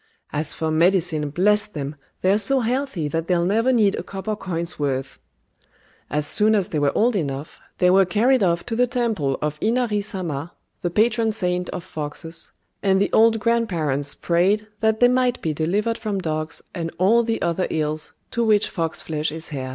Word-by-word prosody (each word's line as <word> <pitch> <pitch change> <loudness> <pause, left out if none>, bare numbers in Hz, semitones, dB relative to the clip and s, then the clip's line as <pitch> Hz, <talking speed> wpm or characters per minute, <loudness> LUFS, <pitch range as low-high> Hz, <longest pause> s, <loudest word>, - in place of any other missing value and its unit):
"As 150 0 -1
for 160 -1 -2
medicine, 165 -2 +2
bless 205 +7 +2
them, 150 -6 -5 0.3
they're 195 +3 +4
so 265 +5 +2
healthy 245 - -1
that 165 +3 -2
they'll 175 -2 +2
never 225 +7 +2
need 215 -5 +3
a - - -3
copper 200 +2 -4
coin's 170 -4 -4
worth!" 135 -2 -2 0.9
As 150 +2 -1
soon 215 +7 +3
as 200 -1 0
they 155 - -1
were 145 -1 +2
old 235 +2 +3
enough, 145 -4 -3 0.2
they 180 -1 +4
were 195 +1 +6
carried 230 +7 +2
off 170 -3 +1
to 230 - -3
the 250 +2 +3
temple 225 - -1
of 150 0 -2
Inari 225 -2 +1
Sama, 175 -6 -5 0.3
the 175 - 0
patron 220 +4 +2
saint 180 -4 -1
of 180 - -5
foxes, 160 0 -4 0.3
and 190 -1 +3
the 200 - 0
old 225 0 +5
grand 230 +1 +1
parents 145 -5 -1
prayed 190 +5 +1
that 220 0 +1
they 245 - +8
might 250 0 +2
be 160 - -2
delivered 205 +9 0
from 210 -3 -2
dogs 155 -3 -3
and 165 -3 -3
all 210 +6 +4
the 230 -1 -1
other 170 +2 0
ills 155 0 -2 0.2
to 235 - 0
which 215 -2 +3
fox 165 -3 -3
flesh 155 -1 -2
is 160 0 -6
heir. 130 -2 -4
185 Hz, 190 wpm, -22 LUFS, 155-220 Hz, 0.9 s, they